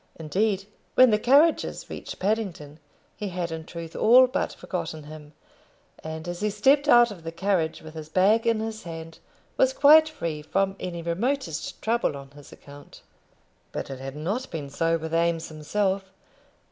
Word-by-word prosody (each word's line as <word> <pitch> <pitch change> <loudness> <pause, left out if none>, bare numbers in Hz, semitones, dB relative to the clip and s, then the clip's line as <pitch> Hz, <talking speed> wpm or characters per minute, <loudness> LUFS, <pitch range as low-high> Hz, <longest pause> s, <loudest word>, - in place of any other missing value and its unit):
Indeed, 195 +5 -1 0.3
when 255 -2 +7
the 210 - +3
carriages 290 +8 +3
reached - - -8
Paddington, 185 -8 -3 0.4
he 210 - -5
had 175 -2 -4
in 160 -1 -6
truth 165 -1 -8
all 250 +4 +7
but 255 - -2
forgotten 155 -1 -5
him; 150 0 -12 0.7
and 160 +1 -6
as 175 0 -5
he 210 - 0
stepped 275 +8 +3
out 240 -3 +6
of 190 -5 -10
the 165 - -5
carriage, 165 -3 -1
with 155 0 -10
his 155 -1 -8
bag 205 +7 +3
in 225 -1 +2
his 220 0 -5
hand, 165 -1 -9 0.4
was - - +3
quite 315 -5 +7
free 165 - -4
from 195 +5 -1
any 170 -2 -5
remotest 185 - -2
trouble 230 -9 0
on 135 0 -12
his 145 0 -15
account. 145 0 -14 0.7
But - - -5
it 135 - -7
had 135 +1 -7
not 200 - -3
been 145 -4 -6
so 165 +3 +1
with 160 0 -6
Eames 165 0 0
himself. 190 +5 -2
175 Hz, 170 wpm, -25 LUFS, 160-220 Hz, 0.7 s, when